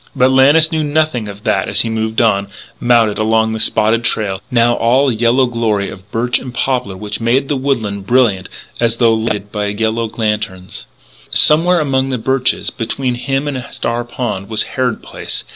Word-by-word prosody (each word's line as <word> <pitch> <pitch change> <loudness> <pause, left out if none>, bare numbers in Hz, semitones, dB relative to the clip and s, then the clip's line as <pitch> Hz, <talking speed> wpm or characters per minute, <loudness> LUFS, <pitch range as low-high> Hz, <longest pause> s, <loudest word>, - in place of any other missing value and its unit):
But 130 +1 +3
Lannis 145 +5 +5
knew 160 -1 0
nothing 150 -6 0
of 100 0 -10
that - - 0
as - - +2
he 115 - -2
moved 110 0 -1
on, 100 -4 +2 0.3
mounted, 115 -4 +2
along 110 +1 +2
the 110 - -3
spotted 110 +2 +2
trail, 105 -4 -1
now 120 -1 +3
all 125 +5 +2
a - - -1
yellow 120 +3 +3
glory 115 -5 -1
of 95 +1 -13
birch 120 +3 0
and 130 - -8
poplar 125 -5 -2
which 105 +3 -6
made 125 +4 +1
the 145 - +1
woodland 110 -8 -2
brilliant 110 -7 +2 0.3
as 115 -1 +1
though 115 -2 +4
lighted 105 -2 -2
by 105 -1 -2
yellow 110 +2 -1
lanterns. 105 -4 -3 0.4
Somewhere 170 +4 +4
among 135 -3 0
the 130 - -1
birches, 130 +2 0
between 125 +2 -3
him 135 +3 -2
and 130 -3 -3
Star 115 +1 -3
Pond, 115 -5 -4
was 110 - +1
Harrod 125 -3 -1
Place. - - -5
115 Hz, 180 wpm, -16 LUFS, 110-130 Hz, 0.4 s, Lannis